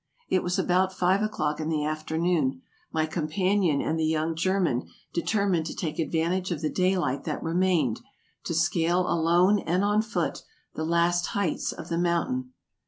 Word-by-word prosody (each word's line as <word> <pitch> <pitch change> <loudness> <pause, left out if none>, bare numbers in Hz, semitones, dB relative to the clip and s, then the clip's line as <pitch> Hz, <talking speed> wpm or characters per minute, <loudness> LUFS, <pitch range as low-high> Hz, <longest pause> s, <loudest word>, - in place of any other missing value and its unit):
It 185 - +2
was 180 0 -1
about 185 +1 +2
five 185 +1 +2
o'clock 155 -8 -1
in 155 0 -2
the 150 -2 0
afternoon; 155 - -1 0.3
my 155 -1 +1
companion 170 +1 +1
and 160 +1 -1
the - - +1
young 160 +1 0
German 170 -6 0 0.3
determined 180 -2 +1
to - - -6
take 155 -3 -4
advantage 170 +4 0
of 170 -5 -3
the 155 - -1
daylight 180 -8 +1
that - - -3
remained, 165 -8 +1 0.5
to - - -2
scale 175 +2 +2
alone 175 +5 +3
and 180 +3 0
on 205 +1 +3
foot 195 -7 -2 0.3
the 155 - -3
last 170 +1 +2
heights 190 -6 0
of - - -9
the 170 0 0
mountain. 255 +10 0
170 Hz, 165 wpm, -27 LUFS, 160-185 Hz, 0.5 s, alone